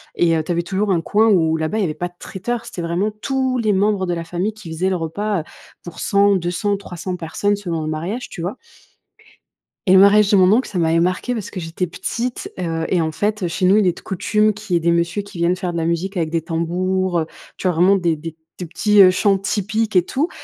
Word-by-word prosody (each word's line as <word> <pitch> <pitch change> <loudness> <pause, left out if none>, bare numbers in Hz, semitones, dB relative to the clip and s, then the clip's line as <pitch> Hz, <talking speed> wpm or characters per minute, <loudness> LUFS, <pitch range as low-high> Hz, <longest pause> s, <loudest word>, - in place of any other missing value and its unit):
Et 165 -1 +3
heu, 160 - 0
tu 175 - -4
avais 170 0 0
toujours 195 +3 -1
un 170 -3 +2
coin 215 +6 +2
où 160 -6 +3
là-bas, 160 +7 -2
il - - +1
y - - +2
avait 155 -4 -1
pas 175 - -3
de 175 - -18
traiteur, 235 +5 -4
c'était 175 - -6
vraiment 175 +6 -1
tous 260 -2 0
les 215 -2 +1
membres 195 -1 +1
de 175 - -1
la 170 - -4
famille 180 +6 -2
qui 195 -7 -11
faisaient 180 +4 0
le 185 - 0
repas, 180 +4 -2
heu, - - -11 0.4
pour 175 - -10
100, 200 0 +3
200, 185 +3 -1
300 180 -2 -6
personnes 200 +5 -1
selon 170 -6 -4
le - - -4
mariage, 175 +11 -4
tu 170 - -8
vois? 185 +9 -4 1.3
Et - - +7
le 190 - +8
mariage 200 +1 +6
de 205 - +4
mon 185 -1 +5
oncle, 245 +5 +2
ça 190 - -4
m'avait 165 0 +2
marquée 185 +8 0
parce 220 -5 -5
que 185 - -6
j'étais 165 +2 -3
petite, 240 +7 -4
heu, 165 -2 -2
et 180 - +2
en 160 -1 -1
fait, 210 +3 -1
heu, - - +1
chez 170 +3 -4
nous, 195 +3 +5
il 200 -4 +3
est 175 - +1
de - - -10
coutume 210 +3 +1
qu'il 210 -2 -6
y 175 - +5
ait - - -2
des 170 - +2
monsieurs 170 +4 0
qui 200 -3 -12
viennent 170 +2 +2
faire 180 -2 -3
de 170 - -4
la 165 - -1
musique 175 +4 -2
avec 160 -2 0
des 165 0 -1
tambours, 175 +2 -1
heu, - - -2 0.3
tu 185 - -2
vois 180 - +1
vraiment 180 +4 +5
des 170 -4 0
des 165 +1 -7 0.2
des 180 - -4
petits, 205 +5 +3
heu, 185 - +7
chants 195 +1 +2
typiques 215 +2 -2
et 180 - +5
tout, 285 - -1
185 Hz, 260 wpm, -20 LUFS, 170-205 Hz, 1.3 s, le